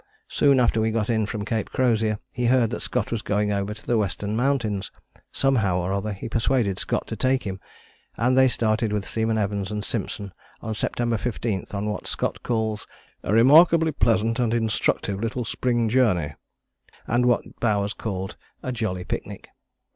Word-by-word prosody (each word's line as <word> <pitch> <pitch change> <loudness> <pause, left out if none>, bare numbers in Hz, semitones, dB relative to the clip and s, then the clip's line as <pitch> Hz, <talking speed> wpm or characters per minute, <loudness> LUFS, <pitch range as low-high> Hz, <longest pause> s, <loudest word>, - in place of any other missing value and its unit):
Soon 140 -2 +4
after 115 -2 +3
we 110 - +2
got 110 0 0
in 110 -2 +1
from 105 -2 -4
Cape 110 -1 -2
Crozier 110 -4 +1
he 125 -1 -1
heard 120 -2 +3
that 110 - -4
Scott - - -2
was 115 -2 -1
going 105 0 0
over 100 0 -1
to 110 0 -8
the 120 -2 +2
Western 105 +1 -2
Mountains: 120 -6 0 0.4
somehow 110 -10 +2
or 90 +1 -1
other 100 +2 -2
he 100 +1 -6
persuaded 115 -4 +1
Scott - - -1
to - - -5
take 130 0 +1
him, 95 -2 -5 0.6
and 125 +3 +2
they 130 0 +6
started 110 -2 +1
with 105 -2 -1
Seaman 110 0 0
Evans 100 -2 -1
and 105 -1 -3
Simpson 100 -3 -4 0.3
on 110 -1 -4
September 120 +1 -1
15 110 -4 -2
on 100 +1 -2
what 105 0 -3
Scott - - -2
calls 110 -2 -2 0.3
"a - - -3
remarkably 160 +8 +6
pleasant 115 -4 +1
and 120 -1 +1
instructive 110 -3 0
little 115 +2 -2
spring 120 +1 0
journey," 105 - +2 0.7
and 120 +1 +2
what 120 - 0
Bowers 105 -3 +1
called 95 -3 -5 0.3
a 130 - -2
jolly 110 -7 -2
picnic. - - -6
110 Hz, 175 wpm, -24 LUFS, 105-120 Hz, 0.7 s, they